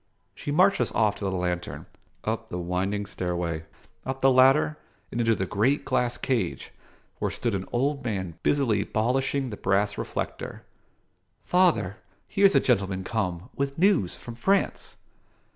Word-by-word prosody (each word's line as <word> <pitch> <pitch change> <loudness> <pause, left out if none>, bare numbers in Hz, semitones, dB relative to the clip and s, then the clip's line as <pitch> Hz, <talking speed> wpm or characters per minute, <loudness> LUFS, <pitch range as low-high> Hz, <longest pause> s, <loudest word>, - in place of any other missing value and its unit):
She - - -7
marched 185 +3 +4
us 120 - +1
off 110 -2 +3
to 100 - -5
the - - +1
lantern, 90 -1 -3 0.4
up - - -3
the 90 - -4
winding 95 +4 -1
stairway, 85 -5 -3 0.4
up 130 0 -4
the 135 0 +5
ladder, 135 +4 +5 0.3
and 120 - -1
into 115 -1 +3
the 95 - -1
great 110 +10 +1
glass 125 -2 0
cage, 125 -4 -2 0.5
where - - 0
stood 120 -3 -2
an 95 -1 -3
old 140 +3 0
man 95 -7 -3
busily 120 -8 +2
polishing 130 +3 0
the 105 - -6
brass 100 +1 +1
reflector. - - -4 0.8
"Father, 175 - +2 0.3
here's 195 -1 +4
a - - +7
gentleman 95 -6 +1
come, 95 -1 -2
with 140 0 -2
news 180 - +3
from 120 - -9
France!" 195 +12 0
115 Hz, 150 wpm, -26 LUFS, 95-135 Hz, 0.8 s, a